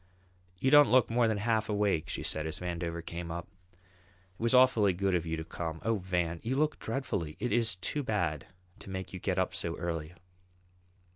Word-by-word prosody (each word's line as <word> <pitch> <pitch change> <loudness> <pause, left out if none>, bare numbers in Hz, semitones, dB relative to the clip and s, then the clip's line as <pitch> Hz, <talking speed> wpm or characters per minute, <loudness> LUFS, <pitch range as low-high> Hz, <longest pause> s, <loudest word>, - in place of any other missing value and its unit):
"You 130 +7 +1
don't 145 -1 +8
look 125 -2 +4
more 120 0 +3
than 110 -1 0
half 110 0 0
awake," 100 -7 +1
she - - -3
said, 80 0 -1
as 80 - -3
Vandover 85 -1 -4
came 85 0 -5
up. 85 +1 -5 0.2
"It 90 0 -32
was 115 0 +1
awfully 125 -6 +5
good 95 +1 0
of 85 -2 0
you 80 0 -2
to 80 - -4
come. 80 0 -5
Oh, 115 -1 +2
Van, 90 -2 -1
you 125 +4 -2
look 150 +2 +1
dreadfully. 100 - -3
It 125 - -1
is 115 -4 +2
too 145 +10 -3
bad 95 - -1 0.3
to - - -11
make 95 -1 -5
you 90 - -5
get 95 0 -1
up 95 - 0
so 85 0 -3
early." 80 -1 -4
95 Hz, 200 wpm, -31 LUFS, 85-115 Hz, 0.3 s, don't